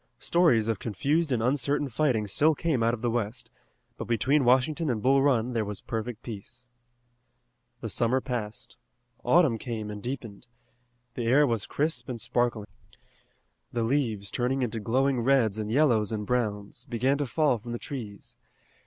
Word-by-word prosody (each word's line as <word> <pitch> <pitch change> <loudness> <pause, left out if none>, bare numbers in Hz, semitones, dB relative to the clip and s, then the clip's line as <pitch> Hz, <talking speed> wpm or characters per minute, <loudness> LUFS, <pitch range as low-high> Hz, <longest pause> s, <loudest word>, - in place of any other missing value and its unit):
Stories 145 -11 +3
of 110 -4 -1
confused 145 - 0
and 115 -3 +1
uncertain 140 +3 +1
fighting 125 -4 +1
still 150 +10 +2
came 150 -5 0
out 115 +1 +2
of 115 - -13
the 120 - +1
west, 115 +1 -3 0.5
but - - -5
between 130 +6 +2
Washington 135 +6 +2
and 120 -4 0
Bull 135 +1 +4
Run 125 -3 +2
there 115 -2 0
was 105 -1 -5
perfect 115 0 -5
peace. 120 +3 -8 1.2
The - - -3
summer 120 +3 +2
passed. 115 -4 -5 0.5
Autumn 125 -3 +4
came 110 -4 -5
and 105 0 -7
deepened. 120 -2 -6 0.7
The 120 -2 -3
air 140 +5 +5
was 115 -6 -1
crisp 140 -5 -2
and 120 -2 -4
sparkling. 120 -1 0 1.1
The 120 -1 -1
leaves, 115 -6 -1
turned 130 +2 0
into 115 -2 -2
glowing 130 +4 +1
reds 115 -4 +2
and 105 -1 -3
yellows 120 -6 +3
and 105 -1 -3
browns, 110 -2 -2
began 130 +2 0
to 145 - -1
fall 145 -3 +2
from 120 +2 -8
the 120 - -2
trees. 115 -7 -8
120 Hz, 160 wpm, -27 LUFS, 110-135 Hz, 1.2 s, air